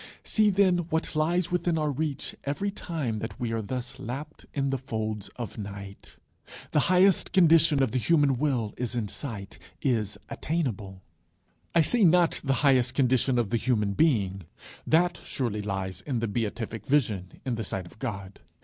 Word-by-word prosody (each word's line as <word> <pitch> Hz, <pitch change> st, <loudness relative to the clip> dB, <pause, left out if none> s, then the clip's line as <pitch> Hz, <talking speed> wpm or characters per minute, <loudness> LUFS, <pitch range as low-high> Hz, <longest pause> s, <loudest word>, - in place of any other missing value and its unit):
See, 215 Hz, -1 st, +3 dB
then, 190 Hz, -2 st, +3 dB
what 160 Hz, 0 st, -1 dB
lies 170 Hz, +3 st, +1 dB
within 175 Hz, -1 st, +1 dB
our 150 Hz, -1 st, 0 dB
reach 145 Hz, 0 st, -3 dB
every 195 Hz, +9 st, -2 dB
time 155 Hz, -, -3 dB
that 115 Hz, -, -6 dB
we 120 Hz, -2 st, -2 dB
are 115 Hz, 0 st, -1 dB
thus 125 Hz, +4 st, -5 dB
lapt 140 Hz, +5 st, -7 dB
in 140 Hz, -1 st, -1 dB
the 135 Hz, -, -1 dB
folds 110 Hz, -5 st, -4 dB
of 120 Hz, -2 st, -6 dB
night. 100 Hz, -1 st, -8 dB, 0.6 s
The -, -, +3 dB
highest 185 Hz, +1 st, +4 dB
condition 165 Hz, -5 st, +5 dB
of 130 Hz, -, 0 dB
the 130 Hz, -, 0 dB
human 145 Hz, -3 st, +3 dB
will 130 Hz, -8 st, 0 dB
is 125 Hz, -1 st, -3 dB
in 115 Hz, -3 st, -1 dB
sight, 105 Hz, -8 st, -6 dB, 0.2 s
is 110 Hz, -6 st, 0 dB
attainable. 105 Hz, -, -3 dB, 0.7 s
I 170 Hz, -, +7 dB
say 230 Hz, +7 st, +3 dB
not 175 Hz, -1 st, +4 dB
the 135 Hz, -1 st, +1 dB
highest 130 Hz, -3 st, +4 dB
condition 130 Hz, -1 st, +2 dB
of 115 Hz, -4 st, 0 dB
the 120 Hz, -, +3 dB
Human 110 Hz, -4 st, +1 dB
Being; 100 Hz, -, +1 dB, 0.4 s
that 170 Hz, +2 st, +3 dB
surely 115 Hz, -6 st, -2 dB
lies 95 Hz, -2 st, -3 dB
in 135 Hz, 0 st, -2 dB
the 115 Hz, 0 st, -1 dB
Beatific 110 Hz, 0 st, -3 dB
Vision, 110 Hz, -10 st, 0 dB
in 130 Hz, -, -1 dB
the 115 Hz, -1 st, -2 dB
sight 95 Hz, -2 st, -3 dB
of 85 Hz, -, -15 dB
God. 100 Hz, -6 st, -5 dB
130 Hz, 170 wpm, -27 LUFS, 110-155 Hz, 0.7 s, I